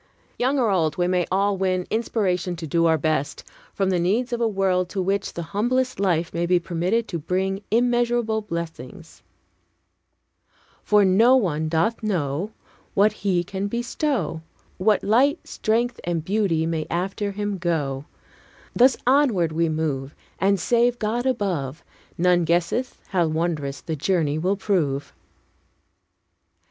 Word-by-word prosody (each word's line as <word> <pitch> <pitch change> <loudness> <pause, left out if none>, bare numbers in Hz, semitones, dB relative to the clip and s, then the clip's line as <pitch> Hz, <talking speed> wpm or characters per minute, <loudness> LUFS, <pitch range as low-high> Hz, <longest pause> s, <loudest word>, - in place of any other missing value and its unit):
Young 260 +3 +1
or 235 -5 +2
old, 160 -5 +1
we 175 0 +1
may 180 -1 +1
all 200 +1 +1
win 185 -1 0
inspiration 195 -5 0
to 165 -1 -6
do 165 +2 +2
our 160 -1 +3
best, 155 -1 -1 0.3
from 195 -1 0
the 180 - +1
needs 225 +9 0
of 240 - -2
a 230 - +3
world 190 -3 0
to 195 - -4
which 195 +2 -1
the 170 - -4
humblest 255 +4 0
life 175 -4 0
may 170 0 -1
be 180 0 +3
permitted 180 +6 -1
to 170 - -3
bring 190 +5 -1
immeasurable 240 -1 +1
blessings: 170 -2 -7 1.6
"For 210 -1 +4
no 225 +7 +5
one 160 - 0
doth 170 +9 0
know 180 -2 -2 0.4
What 205 +1 +4
he 190 -4 0
can 190 +3 -4
bestow, 240 - -2 0.4
What 210 +2 +2
light, 270 - +2
strength, 235 +3 -1
and 165 -2 -2
beauty 190 -5 +1
may 160 -2 -2
after 195 +3 -2
him 205 -1 -3
go: 145 -6 -1 0.7
Thus 255 +1 +5
onward 245 - +3
we 165 +1 +1
move, 150 -3 -2 0.2
And, 195 0 +2
save 240 +5 +2
God 240 +3 -1
above, 175 - -2 0.3
None 180 0 +3
guesseth 175 +10 0
how 175 -4 +2
wondrous 155 -3 -2
the 160 - -4
journey 155 -1 0
will 190 +4 0
prove." 150 -9 -1
185 Hz, 145 wpm, -23 LUFS, 165-220 Hz, 1.6 s, no